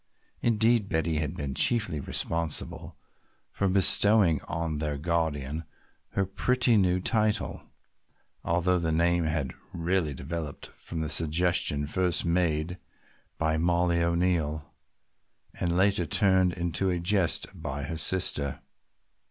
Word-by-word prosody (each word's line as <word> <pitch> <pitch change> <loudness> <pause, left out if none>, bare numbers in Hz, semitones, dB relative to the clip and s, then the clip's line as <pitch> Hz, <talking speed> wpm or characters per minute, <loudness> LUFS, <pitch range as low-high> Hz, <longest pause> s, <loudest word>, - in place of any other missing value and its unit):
Indeed 115 -2 +2
Betty 80 -1 -1
had 75 +2 -3
been 70 -2 -4
chiefly 110 - +2
responsible 80 +1 -4 0.5
for 100 - -2
bestowing 95 -2 +7
on 80 -2 -4
their 75 -2 -3
guardian 80 -2 -3 0.5
her 100 - 0
pretty 125 +5 +1
new 90 -3 +2
title, 105 0 -1 0.7
although 90 +2 0
the 80 -1 -2
name 85 +1 +1
had 75 -4 -2 0.2
really 85 -3 -1
developed 75 +1 -6
from 80 -1 -8
the 80 - -3
suggestion 80 -1 +2
first 90 +4 0
made 85 0 -1 0.6
by 80 -1 -1
Mollie 85 0 +1
O'Neill 85 -3 -1 0.9
and 85 0 -1
later 95 -3 +1
turned 95 0 +2
into 85 +2 -2
a 90 - -1
jest 90 0 +1
by 70 +1 -6
her 80 +2 -5
sister. 80 -4 0
85 Hz, 120 wpm, -27 LUFS, 80-90 Hz, 0.9 s, bestowing